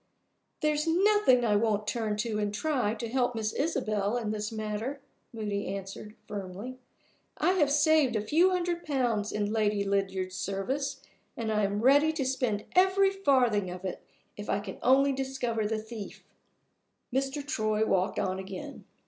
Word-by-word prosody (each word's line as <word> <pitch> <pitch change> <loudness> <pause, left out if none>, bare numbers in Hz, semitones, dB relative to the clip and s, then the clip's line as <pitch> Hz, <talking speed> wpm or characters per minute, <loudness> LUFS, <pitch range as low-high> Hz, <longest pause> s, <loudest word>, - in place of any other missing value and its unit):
"There's 300 +1 +1
nothing 360 - +4
I 210 -2 +3
won't 210 -1 +1
turn 215 -1 -1
to, 215 -1 -1
and 205 -1 0
try, 245 -3 0
to 235 - -5
help 245 0 0
Miss 220 -1 -2
Isabel 215 -8 0
in 220 -3 -2
this 210 0 -3
matter," 220 +5 -3 0.3
Moody 210 -3 -3
answered, 200 +2 -6
firmly. 205 +5 -6 0.6
"I 360 - +3
have 325 -7 +3
saved 295 -3 +4
a 215 - +1
few 335 +10 +4
hundred 350 -2 -1
pounds 240 -8 0
in 210 0 -1
Lady 210 -2 +1
Lydiard's 190 -2 -1
service, 265 +9 -3 0.3
and 225 -2 -2
I 210 -1 +2
am 200 +1 -1
ready 285 +5 +5
to 290 -4 -2
spend 250 -5 -1
every 380 +1 +5
farthing 255 - +2
of 180 +1 -7
it, 185 - -4 0.3
if 205 - -8
I 200 - +1
can 200 -2 -8
only 275 +2 +4
discover 260 -5 -2
the 220 +1 -1
thief." 220 -1 -8 0.9
Mr. 270 +2 -1
Troy 215 -5 0
walked 190 -1 +1
on 190 0 -1
again. 195 +10 -8
225 Hz, 160 wpm, -29 LUFS, 205-275 Hz, 0.9 s, ready